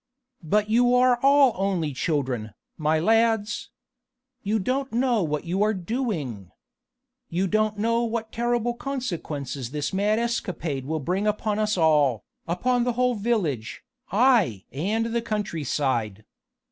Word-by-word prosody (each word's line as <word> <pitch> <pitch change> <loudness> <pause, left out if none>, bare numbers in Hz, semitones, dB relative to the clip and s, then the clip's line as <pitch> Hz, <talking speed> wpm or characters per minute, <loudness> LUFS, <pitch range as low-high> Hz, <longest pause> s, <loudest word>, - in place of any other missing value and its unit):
But 205 +6 +1
you 245 +3 +3
are 250 -1 +4
all 275 -2 +5
only 185 -6 -1
children, 130 -7 -2 0.2
my 155 0 +1
lads. 225 +3 +1 0.7
You 215 +2 0
don't 260 +6 -1
know 240 -1 +2
what 150 -3 -2
you 180 +4 -1
are 215 +1 +2
doing. 170 - -3 0.8
You 180 +3 0
don't 215 +2 +1
know 230 +3 +1
what 225 -1 -3
terrible 240 0 0
consequences 165 - -4
this 145 +4 -3
mad 205 +3 +2
escapade 175 - -2
will 160 0 -2
bring 185 +8 -1
upon 210 0 0
us 215 -1 +1
all, 150 - +3 0.2
upon 245 +9 +1
the 245 0 0
whole 250 +1 +2
village, 200 - -2 0.3
aye! 215 - +3
and 205 - -1
the 235 - +1
country 210 -8 -3
side. 115 -7 -1
205 Hz, 135 wpm, -25 LUFS, 155-235 Hz, 0.8 s, all